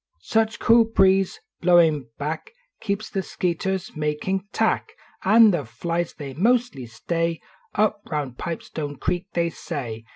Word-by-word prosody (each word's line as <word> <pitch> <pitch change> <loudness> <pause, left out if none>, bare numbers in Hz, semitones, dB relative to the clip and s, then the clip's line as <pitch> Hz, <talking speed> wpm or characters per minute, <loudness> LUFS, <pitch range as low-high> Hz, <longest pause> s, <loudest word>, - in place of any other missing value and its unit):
Such 225 0 +1
cool 230 0 +5
breeze 195 -3 +3 0.2
blowin 165 -6 +4
back 155 +2 -4 0.3
Keeps 205 +1 -2
the 195 - -1
skeeters 185 +1 -2
uiakin 155 +6 -2
tack 440 - 0 0.3
N 215 +2 +7
the 170 -5 -1
flies 170 +9 -3
they 140 -3 -7
mostly 225 - +1
stay 165 +8 -2 0.4
Tp 215 +1 +3 0.2
round 145 -5 -3
Pipestoue 150 -2 -5
creek, 180 +1 -1
they 170 -1 +1
say. 115 -8 -5
170 Hz, 130 wpm, -24 LUFS, 150-195 Hz, 0.4 s, N